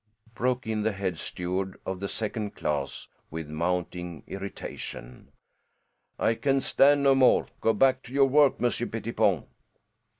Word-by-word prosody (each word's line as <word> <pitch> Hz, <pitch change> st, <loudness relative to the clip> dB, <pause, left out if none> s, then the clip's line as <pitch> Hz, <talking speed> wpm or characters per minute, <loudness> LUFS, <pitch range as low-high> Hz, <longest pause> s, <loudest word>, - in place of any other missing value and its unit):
broke 125 Hz, +2 st, -1 dB
in 110 Hz, -1 st, -1 dB
the 110 Hz, 0 st, 0 dB
head 95 Hz, -4 st, -3 dB
steward 95 Hz, +2 st, -3 dB
of 95 Hz, -1 st, -3 dB
the 100 Hz, -, -3 dB
second 105 Hz, 0 st, -3 dB
class 70 Hz, -2 st, -3 dB, 0.2 s
with 80 Hz, -1 st, -6 dB
mounting 90 Hz, +1 st, -3 dB
irritation. 65 Hz, -10 st, -8 dB, 0.9 s
"I 115 Hz, -, +2 dB
can 135 Hz, +3 st, +1 dB
stand 140 Hz, +1 st, +4 dB
no 135 Hz, -1 st, +6 dB
more. 130 Hz, -1 st, +5 dB, 0.2 s
Go 115 Hz, -, +3 dB
back 130 Hz, +4 st, +3 dB
to 120 Hz, -, -11 dB
your 135 Hz, 0 st, +5 dB
work, 145 Hz, +1 st, +4 dB
Monsieur 120 Hz, -3 st, 0 dB
Pettipon." -, -, 0 dB
105 Hz, 140 wpm, -27 LUFS, 90-130 Hz, 0.9 s, no